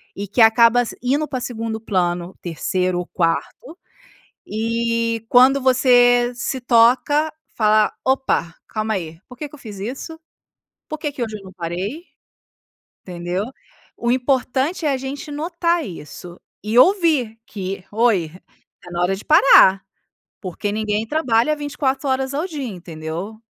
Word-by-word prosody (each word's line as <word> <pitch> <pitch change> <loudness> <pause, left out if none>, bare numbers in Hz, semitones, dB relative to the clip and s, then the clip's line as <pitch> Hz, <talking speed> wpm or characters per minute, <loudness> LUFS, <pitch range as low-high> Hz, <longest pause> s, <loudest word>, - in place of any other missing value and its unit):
e 200 +1 -5
que 215 +5 +1
acaba 230 +2 +6
s 240 - -6
indo 285 +5 +1
pra 260 - -3
2ª 225 -2 -4
plano, 180 -4 -2
3º 180 +2 -1
ou 180 - -4
4º, 185 - -2 0.7
e 230 +1 -1
quando 260 +3 +6
você 245 -1 +4
se 255 +2 -3
toca, 255 +6 +3 0.2
fala: 215 -1 +3
"Opa, 265 -10 0
calma 215 0 -2
aí. 165 -3 -6
Por 250 - -12
que 300 - -5
que 300 - -13
eu - - -16
fiz 210 -5 -9
isso? 270 - -6 0.7
Por 310 - -4
que 300 -2 -3
que 265 -3 -4
hoje 220 -2 -5
eu 200 - -14
não 190 -1 -12
parei?" 185 - -5 1.0
Entendeu? 175 +1 -4 0.5
O 235 - -1
importante 260 +5 0
é 290 - +2
a - - 0
gente 275 +3 -6
notar 335 +2 -1
isso 175 0 -10 0.2
e 215 +3 +1
ouvir 305 - +3
que: 195 -1 -5
"Oi, 210 -7 +2 0.5
tá 175 -1 -5
hora 180 +2 +1
de 200 - -11
parar!" 195 -10 +6 0.6
Porque 190 +2 -4
ninguém 215 +1 -2
trabalha 265 -1 +1
24 290 -1 -2
horas 265 +1 -1
ao 305 +4 -1
dia, 305 -6 -6
entendeu. 175 +2 -7
230 Hz, 145 wpm, -20 LUFS, 195-270 Hz, 1.0 s, acaba